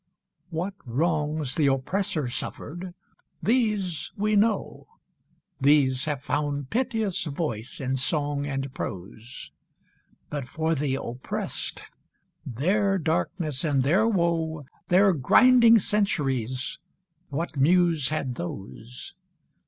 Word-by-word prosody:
III. 175 -3 -52
What 180 +3 -3
wrongs 150 +1 0
the 150 -1 +2
Oppressor 145 +3 0
suffered, 175 +8 -5 0.5
these 210 -8 0
we 210 +1 +1
know; 210 0 +1 0.7
These 140 -1 +3
have 145 -3 -3
found 145 -2 -2
piteous 225 -5 0
voice 140 -7 -4
in 135 0 -1
song 145 +1 0
and 135 -1 -3
prose; 105 +6 -7 0.8
But 145 -4 -4
for 160 +4 -1
the 140 -3 0
Oppressed, 125 -1 -4 0.6
their 195 - +1
darkness 160 -3 -1
and 140 -5 +2
their 190 - +3
woe, 165 -6 0 0.2
Their 190 +2 +5
grinding 230 - +6
centuries, 145 - -1 0.5
what 155 +4 -3
Muse 165 0 +3
had 140 -4 -2
those? 115 +4 -8
155 Hz, 105 wpm, -26 LUFS, 135-185 Hz, 0.8 s, grinding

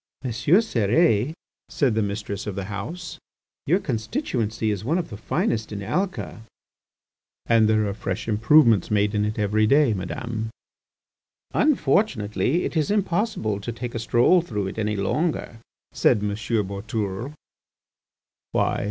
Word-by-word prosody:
"M. 130 - -2
Cérès," 125 - +3 0.4
said 135 -6 +1
the 110 - +1
mistress 100 0 -4
of 100 - -3
the 100 - -3
house, 150 - -6 0.5
"your 170 +6 +4
constituency 115 - -2
is 100 -2 -3
one 155 +9 +1
of 170 -8 -3
the - - -5
finest 110 +1 -1
in 100 -1 -5
Alca." 185 - -2 1.0
"And 115 -2 +4
there 110 -1 +3
are 100 - -2
fresh 100 -1 -4
improvements 115 - +4
made 105 0 +2
in 105 0 +1
it 105 +1 -3
every 105 +1 +2
day, 140 -2 +4
Madame." 110 +4 -4 1.0
"Unfortunately, 140 - +1
it - - -3
is 155 -2 +1
impossible 200 - 0
to 120 - -4
take 120 +1 -6
a 115 - -3
stroll 120 +10 +4
through 105 - -3
it 95 - -5
any 105 0 0
longer," 115 - -1 0.3
said - - +3
M. 105 - 0
Boutourlé. 105 +2 -3 1.2
"Why?" - - +1
110 Hz, 140 wpm, -24 LUFS, 105-145 Hz, 1.2 s, your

